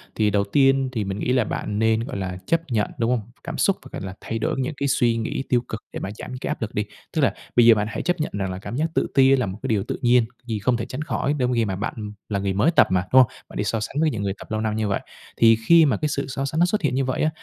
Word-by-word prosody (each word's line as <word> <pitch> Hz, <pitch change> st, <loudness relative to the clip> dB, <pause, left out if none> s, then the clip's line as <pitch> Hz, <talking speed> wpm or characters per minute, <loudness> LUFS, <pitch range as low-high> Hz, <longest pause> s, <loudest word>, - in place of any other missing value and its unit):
Thì 105 Hz, -1 st, +2 dB
đầu 100 Hz, 0 st, +2 dB
tiên 135 Hz, +4 st, +3 dB
thì 115 Hz, -4 st, -2 dB
mình 95 Hz, +1 st, -4 dB
nghĩ 125 Hz, -, 0 dB
là 125 Hz, -3 st, +3 dB
bạn 105 Hz, 0 st, -3 dB
nên, 110 Hz, 0 st, +3 dB
gọi 125 Hz, -3 st, -5 dB
là, 90 Hz, -2 st, -4 dB
chấp 165 Hz, +7 st, +2 dB
nhận, 110 Hz, -3 st, 0 dB
đúng 115 Hz, +1 st, +1 dB
hông? 125 Hz, -, +1 dB, 0.2 s
Cảm 170 Hz, -2 st, -5 dB
xúc 195 Hz, -, +2 dB
và, 130 Hz, -, -12 dB
gọi -, -, -6 dB
là, 95 Hz, -, -6 dB
thay 115 Hz, -, -4 dB
đổi -, -, -1 dB
những 130 Hz, +3 st, -1 dB
cái 140 Hz, -, 0 dB
suy 120 Hz, -3 st, +2 dB
nghĩ 115 Hz, +4 st, -2 dB
tiêu 120 Hz, -1 st, +3 dB
cực 110 Hz, -, -5 dB
để -, -, -4 dB
mà -, -, -4 dB
giảm -, -, -8 dB
cái -, -, -3 dB
áp -, -, -3 dB
lực 110 Hz, -, -3 dB
đi. 105 Hz, -, 0 dB, 0.3 s
Tức -, -, +2 dB
là -, -, +3 dB, 0.2 s
bây 120 Hz, -, +6 dB
giờ 115 Hz, -1 st, +8 dB
bạn 105 Hz, 0 st, -1 dB
hãy -, -, -4 dB
chấp 175 Hz, -1 st, -1 dB
nhận 150 Hz, -, -2 dB
rằng 95 Hz, -2 st, -2 dB
là 95 Hz, -, -5 dB
cảm 110 Hz, -, -6 dB
giác 150 Hz, +4 st, +1 dB
tự -, -, +2 dB
ti 135 Hz, 0 st, +6 dB
là 125 Hz, -, 0 dB
một 95 Hz, 0 st, -5 dB
cái -, -, -2 dB
điều 105 Hz, -4 st, +1 dB
tự -, -, -5 dB
nhiên, 120 Hz, -1 st, +4 dB, 0.2 s
vì 110 Hz, -3 st, -2 dB
không 120 Hz, +4 st, +1 dB
thể 115 Hz, -, -3 dB
tránh 130 Hz, +4 st, -6 dB
khỏi 150 Hz, -2 st, -1 dB
trong 125 Hz, 0 st, +1 dB
khi 115 Hz, -2 st, +2 dB
mà 95 Hz, -2 st, -2 dB
bạn 105 Hz, +1 st, -5 dB, 0.2 s
là 100 Hz, -2 st, -1 dB
người 100 Hz, 0 st, -1 dB
mới 105 Hz, -, +3 dB
tập 170 Hz, -, +5 dB
mà, 90 Hz, -1 st, +2 dB
đúng 130 Hz, -, +9 dB
hông? 125 Hz, -, +2 dB, 0.2 s
Bạn -, -, -9 dB
đi -, -, 0 dB
so 110 Hz, +2 st, -1 dB
sánh 110 Hz, -, -5 dB
với 160 Hz, -, +3 dB
những 105 Hz, -3 st, -3 dB
người 100 Hz, -1 st, -1 dB
tập -, -, -12 dB
lâu 110 Hz, 0 st, -1 dB
năm 110 Hz, -1 st, -1 dB
như 110 Hz, -1 st, 0 dB
vậy. 100 Hz, -, 0 dB, 0.4 s
Thì 115 Hz, -1 st, +6 dB
khi 170 Hz, -1 st, +7 dB
mà 140 Hz, -, +2 dB
cái 150 Hz, -, -1 dB
sự 140 Hz, -1 st, -2 dB
so 135 Hz, +1 st, -3 dB
sánh 155 Hz, +3 st, -2 dB
nó 175 Hz, -, +6 dB
xuất 195 Hz, +3 st, 0 dB
hiện 135 Hz, -5 st, 0 dB
như 135 Hz, 0 st, +1 dB
vậy 130 Hz, -, -1 dB
á, 155 Hz, -, +3 dB
115 Hz, 330 wpm, -23 LUFS, 105-135 Hz, 0.4 s, đúng